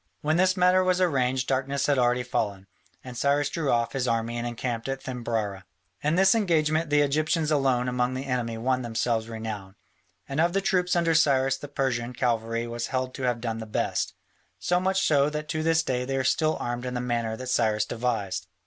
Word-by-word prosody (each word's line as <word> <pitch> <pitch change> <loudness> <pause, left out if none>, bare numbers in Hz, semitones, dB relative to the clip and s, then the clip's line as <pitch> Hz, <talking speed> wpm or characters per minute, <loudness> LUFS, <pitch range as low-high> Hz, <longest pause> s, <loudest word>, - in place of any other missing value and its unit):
When 155 +2 +1
this 185 +1 +3
matter 180 +1 +4
was 185 0 +2
arranged 130 -7 +1
darkness 135 +1 0
had 145 -3 +2
already 125 0 +2
fallen, 100 -5 -2 0.4
and 125 -1 -9
Cyrus 140 +3 +1
drew 160 -4 -2
off 120 -1 +1
his 130 -2 -1
army 115 0 0
and 120 0 -2
encamped 120 0 -3
at 135 0 -4
Thymbrara. 115 -6 -3 0.4
In 150 +2 +1
this 190 +1 +5
engagement 160 -7 +1
the 145 0 +4
Egyptians 155 +2 +1
alone 135 -4 +2
among 125 0 0
the 130 +1 -4
enemy 120 -4 -2
won 130 +3 0
themselves 115 -1 -1
renown, 110 -4 -6 0.5
and 140 +3 0
of 170 +1 +2
the 195 - +2
troops 180 -2 +1
under 170 -1 +2
Cyrus 135 -4 +3
the 145 - -8
Persian 125 -4 -2
cavalry 115 -1 -1
was 120 0 -4
held 130 -1 -2
to 135 - -7
have 120 -2 0
done 115 -2 -3
the 110 - -7
best, 105 - -1 0.4
so 180 0 +1
much 190 +1 +1
so 145 -1 +3
that 150 0 -5
to 155 -1 -1
this 165 0 +2
day 125 -4 -1
they 135 +1 -2
are 130 - 0
still 155 +4 +1
armed 120 +1 -3
in 125 - -4
the - - -1
manner 120 -2 -2
that 130 - -7
Cyrus 110 -4 +1
devised. 105 -6 -2
130 Hz, 205 wpm, -26 LUFS, 120-150 Hz, 0.5 s, this